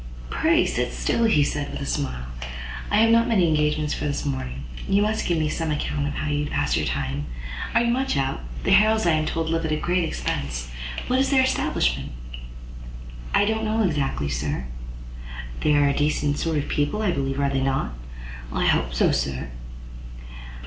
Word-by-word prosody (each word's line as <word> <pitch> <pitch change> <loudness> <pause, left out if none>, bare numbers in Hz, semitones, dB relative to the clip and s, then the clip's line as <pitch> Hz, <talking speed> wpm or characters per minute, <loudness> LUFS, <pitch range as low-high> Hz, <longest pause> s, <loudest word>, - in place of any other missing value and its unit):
"Pray - - +3
sit - - -1
still," 225 - +1
said 145 0 -1
he, - - -8
with - - -4
a 140 - -4
smile; 135 - -2 0.6
"I - - +3
have 225 0 +5
not 230 0 +5
many 200 -7 +3
engagements 150 -1 +1
for - - -3
this 145 0 -2
morning. 70 - -3 0.3
You 200 +1 +4
must 215 +1 0
give 175 - +2
me 155 -1 +1
some 160 +1 -2
account 145 -1 -1
how 155 - -2
you 145 0 0
pass - - 0
your - - 0
time. 70 +2 -2 0.5
Are 230 - +5
you 235 - +2
much 265 - 0
out? 135 - -1 0.2
The - - +1
Harrels, 220 0 +5
I 170 - +4
am 155 -1 +1
told, 165 0 -1
live 165 0 0
at 160 - -1
a - - +2
great 175 +3 +1
expense. - - -3 0.3
What 255 +1 +1
is 270 - +2
their 265 -2 +5
establishment?" 65 - 0 1.2
"I 205 - +5
don't 220 +1 0 0.2
exactly 140 - -1
know, 70 - -2
sir." 65 - -2 1.0
"They 150 - +3
are 145 -1 +4
decent 145 0 +1
sort 165 -2 0
of 145 - -1
people, 150 +9 0
I 200 - +2
believe; 135 -3 -1
are 140 -1 +1
they 135 -1 0
not?" 135 - 0 0.6
"I - - 0
hope - - +2
so, - - +4
sir!" 65 -3 -2
150 Hz, 190 wpm, -24 LUFS, 135-185 Hz, 1.2 s, have